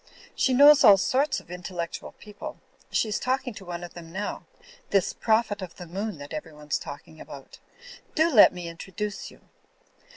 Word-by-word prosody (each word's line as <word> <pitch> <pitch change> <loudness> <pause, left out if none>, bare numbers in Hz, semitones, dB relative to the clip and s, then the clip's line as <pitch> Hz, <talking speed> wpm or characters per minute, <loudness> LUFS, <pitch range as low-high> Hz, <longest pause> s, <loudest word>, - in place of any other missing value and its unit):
She 260 -2 +1
knows 290 +2 +8
all 200 - +9
sorts 265 +8 +1
of 175 - -16
intellectual 175 -1 -6
people. 210 -1 -10 0.3
She - - +1
is 210 - -2
talking 255 -1 -1
to 195 - -11
one 175 0 -6
of 175 - -9
them 165 -1 -11
now; 205 +4 -5 0.4
this 195 -3 +2
Prophet 220 -2 +1
of 180 -3 -8
the 180 - -9
Moon 195 +3 -4
that 145 0 -9
everyone's 150 -1 -4
talking 145 +2 -10
about. 135 -1 -12 0.6
Do 320 0 +3
let 215 - +8
me 175 -1 -7
introduce 195 +4 -6
you." - - -18
190 Hz, 170 wpm, -26 LUFS, 170-220 Hz, 0.6 s, all